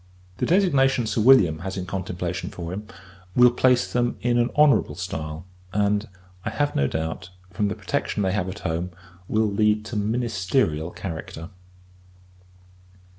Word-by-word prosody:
The - - -1
designation 140 - +3
Sir 110 +1 0
William 105 -11 +6
has 95 +3 -5
in 90 - -3
contemplation 90 -2 -4
for 85 0 -6
him, 105 +2 -6 0.5
will 125 0 +7
place 125 0 +2
them 120 0 +1
in 120 0 +2
an 120 +1 +2
honourable 150 -6 +4
stile; 80 -2 -5 0.3
and, 105 +1 +1 0.3
I - - -2
have 145 0 -1
no 70 - +2
doubt, 80 +4 -4 0.2
from 105 +3 0
the - - -2
protection 105 - -2
they 95 - +1
have 95 -2 -1
at 100 +3 -7
home, 85 +3 -1 0.4
will 110 0 +2
lead 105 +1 +1
to 115 - -6
ministerial 105 - 0
character. 80 -1 -7
100 Hz, 150 wpm, -24 LUFS, 90-120 Hz, 0.5 s, will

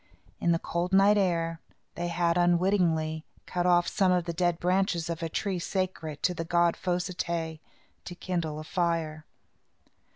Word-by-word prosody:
In 170 - +2
the 165 - +3
cold 175 +2 -3
night 200 +2 +6
air, 165 -4 0 0.3
they 175 - -3
had, 170 0 +1
unwittingly, 175 -3 +2 0.2
cut 180 0 -1
off 175 -1 +4
some 190 -2 +2
of 180 -2 +2
the 170 - -3
dead 175 0 +1
branches 180 -2 +1
of 165 0 -5
a 165 - -2
tree 190 +2 -2
sacred 170 -5 -3
to 180 - +2
the 165 - -4
god 170 0 +2
Fos 180 -1 -1
i 185 - -6
té 165 -2 -3 0.5
to 175 - -7
kindle 170 -4 -3
a - - -6
fire. 160 -2 -2
175 Hz, 170 wpm, -28 LUFS, 165-180 Hz, 0.5 s, night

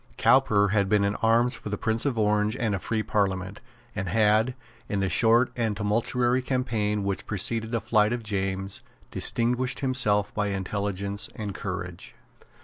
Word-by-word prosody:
Cowper 105 -6 +4
had 100 -1 +1
been 105 -1 +3
in 100 +1 0
arms 115 +3 +3
for - - -7
the 105 - -2
Prince 115 +5 0
of 130 -4 -1
Orange 105 +1 +1
and 110 -5 -1
a 100 - -1
free 110 +3 -2
Parliament, 95 -1 -1 0.3
and 95 -3 -3
had, 110 +3 +3 0.3
in 100 - -1
the 95 -1 0
short 115 +8 +3
and 110 -4 -1
tumultuary 120 +4 +1
campaign 115 -6 -1
which 100 -1 -3
preceded 110 +3 -1
the 115 - 0
flight 110 -1 +2
of 120 -1 -3
James, 95 -2 -3 0.3
distinguished 125 +2 0
himself 105 -7 +2
by 105 -1 -1
intelligence 100 0 -2
and 105 -2 -5
courage. 90 -3 -6
105 Hz, 160 wpm, -26 LUFS, 100-115 Hz, 0.3 s, Cowper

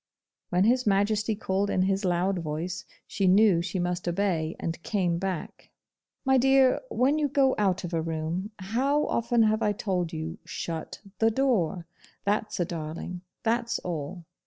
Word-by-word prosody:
When 180 +1 +3
His 250 +2 +3
Majesty 210 +2 +2
called 200 0 -1
in 185 - +2
his 195 +1 0
LOUD 180 +1 +1
voice, 165 +2 -4 0.2
she 195 - 0
knew 190 -2 +5
she 180 +2 -3
must 175 0 -2
obey, 175 -3 0
and 165 +1 -4
came 175 -3 0
back. 185 -3 -5 0.6
'My 265 0 +4
dear, 270 0 +4
when 285 - +2
you 295 - +2
go 270 -1 +3
out 190 -2 +1
of 175 -1 -5
a 165 - +1
room, 165 +4 -3
how 260 +10 +1
often 235 0 +2
have 215 +1 +2
I 210 -1 +2
told 180 -4 -2
you, 160 +3 -5
SHUT 165 -2 -5 0.2
THE 225 - +4
DOOR. 215 - +1 0.4
That's 210 0 -1
a 175 - +2
darling. 165 +2 -5 0.2
That's 235 +1 +1
all. 170 0 -5
190 Hz, 160 wpm, -27 LUFS, 175-220 Hz, 0.6 s, knew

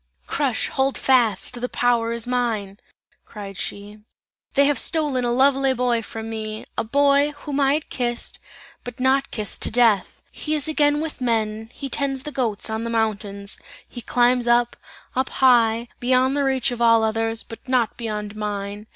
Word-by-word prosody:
"Crush, - - -1
hold 270 0 0
fast! 240 -3 +2
the 250 - -2
power 235 -2 +1
is 235 -1 -3
mine!" 225 -5 -2 0.4
cried 200 -2 -9
she. 205 +3 -7 0.6
"They 280 0 +5
have 285 -3 +2
stolen 295 -6 0
a 240 - 0
lovely 270 +1 +3
boy 245 -2 +1
from 225 0 -7
me, 220 -1 -5
a - - 0
boy, 280 +4 +3
whom 290 -1 -3
I 275 0 +3
had 310 - -4
kissed, 240 -2 -3 0.4
but 245 0 -8
not 265 +2 +2
kissed 210 -2 -3
to - - +2
death. 225 -5 +2
He 310 0 -2
is 295 -1 0
again 295 -1 +2
with 315 -4 -5
men, 220 -2 -1
he 275 - -6
tends 270 0 -1
the 300 - -5
goats 230 -7 -1
on 220 0 -3
the 230 - -3
mountains; 205 -3 -1 0.3
he 240 - -8
climbs 245 0 +2
up, 240 0 +3 0.4
up 260 0 0
high, 235 -3 +3
beyond 255 +2 +2
the 285 -1 +1
reach 265 -1 +1
of 240 -1 -5
all 230 -1 +5
others, 225 +1 -1
but 225 - -10
not 250 -3 +1
beyond 210 -3 -5
mine! 205 0 -4
240 Hz, 175 wpm, -22 LUFS, 220-265 Hz, 0.6 s, They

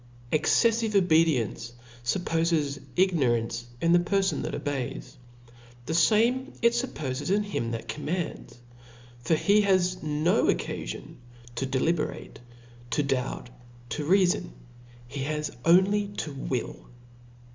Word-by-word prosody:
Exceffive 225 +7 +2
obedience 160 - +2 0.3
fuppofes 160 -1 0 0.2
ignorance 120 -10 +1
in 165 - +2
the 175 - +6
perfon 195 +2 0
that - - -3
obeys: 140 -4 -4 0.7
the 160 - -3
fame 230 +10 +3
it 235 0 +5
fuppoies 150 - -3
in 205 +2 +2
him 195 - -3
that 115 -1 -5
commands; 155 -3 -4 0.6
for 140 +7 +1
he 205 +6 +3
has 185 -2 +2
nooccafionto 150 - -1 0.5
deliberate, 150 +5 -1 0.5
to 145 +5 +1
doubt, 130 -2 -2 0.4
to 150 +5 -3
reafon; 180 - +2 0.6
he 140 +3 -7
has 150 +2 -3
only 195 +4 +4
to 160 -7 -5
will. 130 -3 -4
160 Hz, 105 wpm, -27 LUFS, 135-190 Hz, 0.7 s, the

